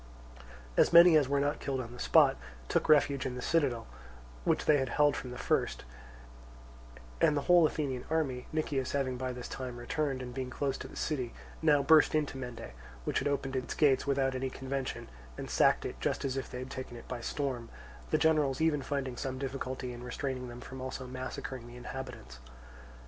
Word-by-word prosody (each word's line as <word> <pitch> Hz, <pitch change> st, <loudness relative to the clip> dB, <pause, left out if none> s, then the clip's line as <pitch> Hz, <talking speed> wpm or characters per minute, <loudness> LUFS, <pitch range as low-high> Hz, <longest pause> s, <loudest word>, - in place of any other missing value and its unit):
As -, -, +5 dB
many 170 Hz, 0 st, +9 dB
as 145 Hz, -4 st, +4 dB
were 140 Hz, 0 st, +2 dB
not 145 Hz, +1 st, 0 dB
killed 135 Hz, -2 st, -2 dB
on 120 Hz, -1 st, -6 dB
the 125 Hz, -, -11 dB
spot -, -, +5 dB, 0.3 s
took -, -, 0 dB
refuge 140 Hz, -3 st, +4 dB
in 125 Hz, -, -4 dB
the -, -, -5 dB
citadel, 140 Hz, -8 st, +1 dB, 0.6 s
which -, -, +1 dB
they 150 Hz, -, +5 dB
had 130 Hz, -2 st, -1 dB
held 145 Hz, +3 st, +3 dB
from 125 Hz, -, -5 dB
the 125 Hz, -, -7 dB
first; -, -, 0 dB, 1.4 s
and 150 Hz, -, +4 dB
the -, -, +1 dB
whole, 175 Hz, 0 st, +6 dB
Athenian 135 Hz, -5 st, -3 dB
army, 140 Hz, -6 st, -1 dB
Nicias 145 Hz, -4 st, -1 dB
having 135 Hz, -2 st, 0 dB
by 130 Hz, 0 st, -3 dB
this 125 Hz, -1 st, -6 dB
time 125 Hz, -2 st, -6 dB
returned 135 Hz, +2 st, -2 dB
and 125 Hz, -1 st, -7 dB
being 130 Hz, -1 st, -4 dB
close 135 Hz, 0 st, -1 dB
to -, -, -6 dB
the -, -, -13 dB
city, 130 Hz, -7 st, -2 dB, 0.3 s
now 150 Hz, -3 st, +4 dB
burst 155 Hz, +1 st, +6 dB
into 150 Hz, -3 st, 0 dB
Mende, 125 Hz, -, -7 dB, 0.3 s
which -, -, 0 dB
had -, -, -1 dB
opened 135 Hz, -1 st, -1 dB
its 130 Hz, -1 st, -3 dB
gates 140 Hz, -3 st, +3 dB
without 135 Hz, -1 st, +2 dB
any 130 Hz, +1 st, -2 dB
convention, 135 Hz, 0 st, -4 dB, 0.3 s
and -, -, -6 dB
sacked -, -, +4 dB
it -, -, -5 dB
just -, -, -1 dB
as 135 Hz, -1 st, -1 dB
if 135 Hz, -, -3 dB
they -, -, -6 dB
had 130 Hz, +2 st, -6 dB
taken 130 Hz, -3 st, -6 dB
it 115 Hz, -, -12 dB
by 125 Hz, -2 st, -5 dB
storm, 130 Hz, -3 st, -3 dB, 0.4 s
the -, -, +3 dB
generals 150 Hz, -4 st, +2 dB
even 160 Hz, -3 st, +2 dB
finding 135 Hz, -2 st, -3 dB
some 130 Hz, -1 st, -3 dB
difficulty 130 Hz, -1 st, -4 dB
in 120 Hz, 0 st, -9 dB
restraining 130 Hz, 0 st, -4 dB
them 120 Hz, 0 st, -9 dB
from 130 Hz, +1 st, -8 dB
also 130 Hz, 0 st, -5 dB
massacring 130 Hz, -1 st, -6 dB
the 120 Hz, -, -11 dB
inhabitants. 125 Hz, -, -8 dB
130 Hz, 200 wpm, -31 LUFS, 125-145 Hz, 1.4 s, many